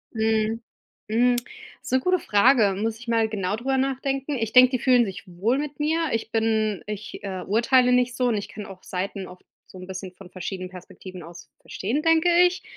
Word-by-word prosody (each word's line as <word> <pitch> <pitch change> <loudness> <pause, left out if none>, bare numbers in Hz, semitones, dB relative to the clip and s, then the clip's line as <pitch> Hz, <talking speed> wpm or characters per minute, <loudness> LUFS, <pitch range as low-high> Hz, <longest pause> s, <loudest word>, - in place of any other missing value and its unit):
Mhm, 220 0 0 0.5
mhm, 245 +3 +3 0.5
ist - - -8
'ne 260 - +4
gute 365 +6 +1
Frage, 210 -2 +4
muss 225 0 -1
ich 240 +2 -13
mal 225 -1 +2
genau 205 -2 -2
drüber 265 +3 -1
nachdenken. 270 +1 -1
Ich 225 -2 -3
denke, 255 0 +8
die 255 - 0
fühlen 250 -1 +4
sich 195 -2 -7
wohl 195 +8 0
mit 290 0 -4
mir. 320 +2 0
Ich 225 0 -3
bin 220 -2 0
ich, 210 0 -7
äh, 190 -2 -4
urteile 245 +4 +3
nicht 250 0 +2
so 250 -1 +1
und 225 - 0
ich 205 - -4
kann 210 - -8
auch 190 -1 -11
Seiten 190 +1 -4
oft 180 0 -14 0.2
so - - -13
'n 185 0 -10
bisschen 190 -1 -7
von 185 0 -14
verschiedenen 185 0 -6
Perspektiven 185 0 -11
aus 170 +1 -12
verstehen, 235 +10 -3
denke 325 +1 +3 0.2
ich. 360 +1 -5
225 Hz, 200 wpm, -24 LUFS, 195-255 Hz, 0.5 s, denke